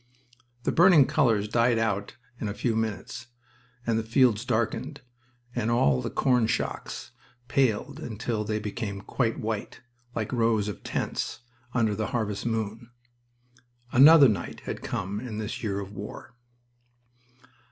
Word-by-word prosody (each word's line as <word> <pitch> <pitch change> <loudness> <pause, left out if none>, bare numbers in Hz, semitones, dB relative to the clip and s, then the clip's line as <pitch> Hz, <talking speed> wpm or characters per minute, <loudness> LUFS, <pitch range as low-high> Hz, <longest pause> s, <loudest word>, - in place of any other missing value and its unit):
The - - +1
burning 170 -5 +7
colors 115 -10 +2
died 120 +1 +2
out 100 -2 -1 0.2
in 110 - -2
a 100 - -4
few 115 0 0
minutes, 110 +3 -3 0.6
and 115 -1 +1
the - - -2
fields 115 -1 +3
darkened, 120 +4 -1 0.5
and 115 -2 -1
all 70 - +3
the - - -3
corn 125 -4 +2
shocks - - -3 0.4
paled 135 +2 +1
until 115 -5 -3
they 105 0 -1
became 105 -1 -4
quite 115 +1 -1
white, 110 0 -4 0.3
like 110 +1 -2
rows 115 -3 +2
of 105 - -5
tents, - - -3 0.3
under 110 -4 +2
the 110 +1 -2
harvest 110 -3 -2
moon. 115 +1 -3 1.0
Another 145 +2 +9
night 100 -7 -2
had - - -5
come 100 +3 -3
in 115 -3 -6
this 110 -1 -4
year 100 -3 -2
of 100 -1 -7
war. 100 +4 -8
110 Hz, 140 wpm, -27 LUFS, 105-125 Hz, 1.0 s, Another